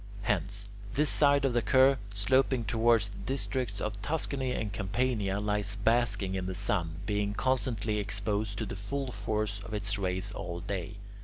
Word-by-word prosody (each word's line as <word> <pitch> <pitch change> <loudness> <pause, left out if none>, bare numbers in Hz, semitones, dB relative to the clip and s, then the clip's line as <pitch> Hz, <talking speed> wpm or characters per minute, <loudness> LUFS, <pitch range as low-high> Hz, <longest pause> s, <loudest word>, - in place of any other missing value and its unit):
Hence, 100 0 0 0.3
this 150 +1 +3
side 140 -1 +4
of 130 - +1
the 120 - +3
curve, 130 +2 +5 0.2
sloping 130 +3 +2
towards 110 0 +3
the 100 - -11
districts 130 -5 -2
of 105 -1 -3
Tuscany 135 -1 -1
and 105 -5 -2
Campania, 105 -1 0
lies 105 0 +1
basking 105 -3 +1
in 95 -1 -2
the 95 - -3
sun, 90 -5 0
being 105 -1 0
constantly 115 -5 0
exposed 100 +1 -1
to 110 - -2
the 95 - -5
full 130 +7 -3
force 105 -1 -1
of 105 +2 -5
its 100 0 0
rays 95 +1 -1
all 85 -4 -5
day. 95 +2 -4
105 Hz, 165 wpm, -30 LUFS, 100-120 Hz, 0.3 s, curve